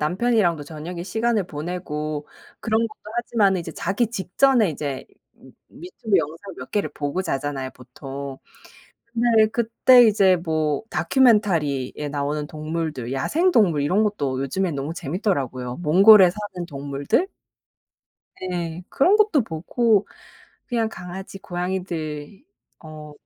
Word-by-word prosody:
남편이랑도 175 Hz, -1 st, +1 dB
저녁에 165 Hz, +3 st, -7 dB
시간을 220 Hz, +2 st, 0 dB
보내고 155 Hz, -2 st, -4 dB, 0.3 s
그런 220 Hz, -1 st, +1 dB
것도 -, -, -15 dB, 0.2 s
하지만은 205 Hz, -6 st, +2 dB
이제 165 Hz, -, -7 dB
자기 210 Hz, +3 st, -1 dB
직전에 225 Hz, +1 st, +2 dB
이제 140 Hz, -3 st, -4 dB, 0.7 s
유튜브 225 Hz, -, -2 dB
영상 165 Hz, +6 st, -5 dB
몇 -, -, -9 dB
개를 205 Hz, -, -1 dB
보고 145 Hz, +6 st, -2 dB
자잖아요 135 Hz, -4 st, -3 dB
보통. 135 Hz, +2 st, -8 dB, 0.7 s
근데 230 Hz, -2 st, +3 dB
그때 235 Hz, +2 st, +5 dB
이제 195 Hz, -4 st, +4 dB
뭐 155 Hz, -2 st, -1 dB
다큐멘터리에 170 Hz, -, +2 dB
나오는 145 Hz, +1 st, -2 dB
동물들, 155 Hz, -5 st, -4 dB
야생동물 210 Hz, -, +2 dB
이런 185 Hz, +9 st, +2 dB
것도 140 Hz, -11 st, -1 dB
요즘에 180 Hz, +7 st, -1 dB
너무 140 Hz, +3 st, -4 dB
재밌더라고요. 135 Hz, -, -2 dB
몽골에 185 Hz, +4 st, +7 dB
사는 190 Hz, -3 st, -6 dB
동물들? 140 Hz, -, -1 dB, 1.1 s
네. 175 Hz, -2 st, -4 dB
그런 370 Hz, +9 st, +3 dB
것도 420 Hz, -, +3 dB
보고 210 Hz, +5 st, +1 dB, 0.6 s
그냥 230 Hz, -4 st, 0 dB
강아지, 190 Hz, -1 st, -8 dB
고양이들 175 Hz, -, -5 dB, 0.4 s
어 155 Hz, -1 st, -10 dB
175 Hz, 285 characters per minute, -23 LUFS, 150-215 Hz, 1.1 s, 몽골에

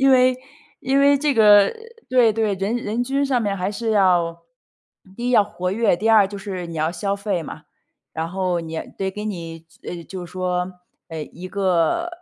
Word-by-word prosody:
因 270 Hz, 0 st, +5 dB
为 255 Hz, -1 st, +5 dB, 0.4 s
因 270 Hz, +2 st, +1 dB
为 280 Hz, 0 st, +5 dB
这 290 Hz, -1 st, +1 dB
个 210 Hz, -2 st, +7 dB
呃， -, -, -3 dB, 0.4 s
对， 245 Hz, -3 st, +5 dB
对， 215 Hz, -2 st, 0 dB
人 200 Hz, +5 st, -2 dB
人 230 Hz, 0 st, -2 dB
均 275 Hz, +3 st, 0 dB
上 250 Hz, -4 st, +1 dB
面 200 Hz, -1 st, -1 dB
还 185 Hz, +2 st, -2 dB
是 225 Hz, +2 st, -3 dB
要 175 Hz, -5 st, +2 dB, 0.7 s
第 240 Hz, +1 st, -4 dB
一 -, -, +1 dB
要 230 Hz, -4 st, +6 dB
活 180 Hz, -2 st, -4 dB
跃， 220 Hz, -3 st, +2 dB
第 215 Hz, +6 st, -1 dB
二 215 Hz, -3 st, +6 dB
就 200 Hz, -, -7 dB
是 190 Hz, -3 st, -5 dB
你 170 Hz, -, -8 dB
要 160 Hz, +2 st, 0 dB
消 200 Hz, +1 st, -2 dB
费 200 Hz, -4 st, -2 dB
嘛。 -, -, -9 dB, 0.5 s
然 160 Hz, +1 st, -3 dB
后 185 Hz, -2 st, -1 dB
你 160 Hz, -1 st, -5 dB, 0.2 s
得 190 Hz, -1 st, -2 dB
给 210 Hz, +2 st, -7 dB
你 165 Hz, -4 st, -6 dB, 0.2 s
呃， 175 Hz, -1 st, -6 dB
就 185 Hz, -2 st, -7 dB
是 170 Hz, -, -13 dB
说 180 Hz, 0 st, -2 dB, 0.4 s
呃， 160 Hz, -2 st, -5 dB
一 180 Hz, +3 st, -8 dB
个 190 Hz, -, +1 dB
200 Hz, 215 characters per minute, -22 LUFS, 180-230 Hz, 0.7 s, 个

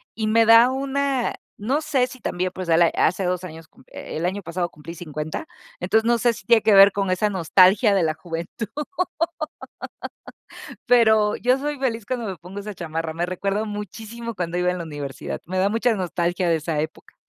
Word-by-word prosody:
y 220 Hz, -1 st, -2 dB
me 225 Hz, +1 st, +4 dB
da 230 Hz, +3 st, +7 dB
una, 275 Hz, -1 st, -1 dB, 0.2 s
no 265 Hz, +9 st, -1 dB
sé 260 Hz, -5 st, +1 dB
si 255 Hz, 0 st, -12 dB
también 180 Hz, +1 st, -2 dB
pues 185 Hz, -1 st, -5 dB
la 165 Hz, +1 st, +5 dB
hace 185 Hz, +2 st, +1 dB
2 180 Hz, 0 st, -1 dB
años 160 Hz, -2 st, -9 dB
cump -, -, -23 dB
el 160 Hz, +2 st, -5 dB
año 190 Hz, +3 st, -2 dB
pasado 175 Hz, +1 st, -3 dB
cumplí 160 Hz, +3 st, -10 dB
50. 155 Hz, -, -5 dB, 0.3 s
entonces 220 Hz, +5 st, +1 dB
no 240 Hz, -, +4 dB
sé 240 Hz, +1 st, +3 dB
si 195 Hz, -, -12 dB
tiene 230 Hz, -2 st, +5 dB
que 215 Hz, -, +4 dB
ver 195 Hz, +1 st, +9 dB
con 195 Hz, -2 st, -1 dB
esa 210 Hz, +3 st, +1 dB
nostalgia 190 Hz, +3 st, +4 dB
de 185 Hz, -, +2 dB
la 155 Hz, -1 st, +1 dB
juventud. 170 Hz, +6 st, -6 dB, 2.2 s
Pero 220 Hz, -3 st, +4 dB
yo 250 Hz, +2 st, +2 dB
soy 290 Hz, +1 st, -3 dB
feliz 230 Hz, -5 st, -2 dB
cuando 245 Hz, -3 st, -3 dB
me 190 Hz, -3 st, -4 dB
pongo 180 Hz, +5 st, -9 dB
esa 210 Hz, 0 st, -7 dB
chamarra, 165 Hz, -1 st, -4 dB
me 170 Hz, +2 st, -1 dB
recuerdo 195 Hz, +4 st, -2 dB
muchísimo 220 Hz, +3 st, -6 dB
cuando 175 Hz, -1 st, -3 dB
iba 180 Hz, 0 st, +2 dB
en 180 Hz, -, -3 dB
la 170 Hz, -, -5 dB
universidad, 145 Hz, -3 st, -6 dB
me 185 Hz, +1 st, -3 dB
da 195 Hz, +2 st, +3 dB
mucha 230 Hz, +1 st, +1 dB
nostalgia 175 Hz, -1 st, -1 dB
de 165 Hz, -, +3 dB
esa 155 Hz, 0 st, -3 dB
época. 155 Hz, +1 st, -7 dB
195 Hz, 195 wpm, -23 LUFS, 170-230 Hz, 2.2 s, ver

